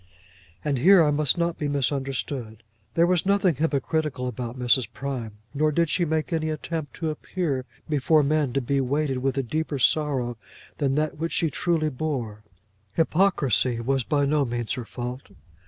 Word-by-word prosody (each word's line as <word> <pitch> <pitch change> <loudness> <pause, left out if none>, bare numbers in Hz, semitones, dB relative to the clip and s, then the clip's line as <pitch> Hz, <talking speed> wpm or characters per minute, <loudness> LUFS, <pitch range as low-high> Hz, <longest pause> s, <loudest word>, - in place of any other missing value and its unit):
And 140 -4 +1
here 180 +5 +7
I 150 - +3
must 150 +2 +2
not 170 -1 0
be 150 - -1
misunderstood. 135 -4 -2 0.3
There 170 - +5
was 180 -1 +2
nothing 195 -2 +3
hypocritical 150 -2 -1
about 125 0 -5
Mrs. 125 -1 +2
Prime, 125 -5 -4 0.2
nor 155 +1 +2
did 165 +1 +1
she 175 - +1
make 160 +2 -1
any 160 -1 0
attempt 155 -1 -4
to 160 -2 -2
appear 150 -4 -3 0.2
before 150 0 +3
men 150 -2 +1
to 135 - +1
be 135 +2 0
weighted 135 0 0
with 135 +1 -1
a 135 - +1
deeper 155 +3 -2
sorrow 130 -3 +1 0.4
than 135 -2 +1
that 150 0 -1
which 165 -1 -2
she 165 -3 +1
truly 165 -3 0
bore; 125 -7 -4 0.5
hypocrisy 155 - +2
was 135 +2 0
by 145 +3 +1
no 145 +1 +2
means 120 -3 -2
her 125 - -4
fault. 125 +3 -6
145 Hz, 170 wpm, -25 LUFS, 130-155 Hz, 0.5 s, here